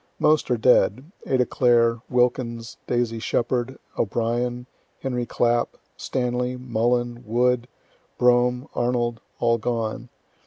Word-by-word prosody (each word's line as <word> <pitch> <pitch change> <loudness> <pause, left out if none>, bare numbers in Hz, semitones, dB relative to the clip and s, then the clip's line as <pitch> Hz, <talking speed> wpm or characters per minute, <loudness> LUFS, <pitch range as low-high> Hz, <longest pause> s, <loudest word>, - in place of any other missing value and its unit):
Most 155 0 +2
are 125 - +2
dead 125 - +3 0.2
Ada 130 -2 +2
Clare, 115 -2 +3
Wilkins, 120 -2 0
Daisy 120 -2 0
Sheppard, 120 +3 -1 0.2
O'Brien, 120 +3 -1 0.4
Henry 125 -3 -2
Clapp, 120 0 +1 0.2
Stanley, 125 0 -2
Mullin, 120 0 -1
Wood, 120 +1 +1 0.5
Brougham, 125 +2 +3
Arnold 120 -2 -1 0.2
all 115 -1 +2
gone. 115 +1 -3
120 Hz, 105 wpm, -24 LUFS, 115-125 Hz, 0.5 s, dead